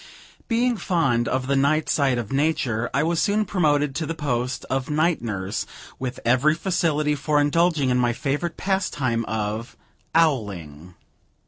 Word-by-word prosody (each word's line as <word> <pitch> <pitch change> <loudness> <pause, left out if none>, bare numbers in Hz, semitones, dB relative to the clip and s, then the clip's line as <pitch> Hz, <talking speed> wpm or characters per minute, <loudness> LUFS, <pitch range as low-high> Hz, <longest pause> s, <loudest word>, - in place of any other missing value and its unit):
Being 240 0 +1
fond 135 -11 +1
of 130 0 -1
the 140 +1 +1
night 145 +3 +2
side 135 -4 +2
of 115 -4 -4
nature, 135 -6 0
I 140 - +1
was 165 +1 +1
soon 210 +1 +1
promoted 150 -7 +1
to 150 +2 -3
the 165 - -3
post 125 -5 -2
of 135 +1 -2
night 155 +1 +1
nurse, 100 -4 -3 0.3
with 130 -1 -4
every 130 +6 +3
facility 160 -4 0
for 150 +1 +1
indulging 145 -2 +2
in 125 - +2
my 120 -1 +2
favorite 145 +7 -2
pastime 145 -12 -1
of 110 +1 -3 0.4
"owling." 95 - 0
140 Hz, 150 wpm, -23 LUFS, 120-160 Hz, 0.4 s, every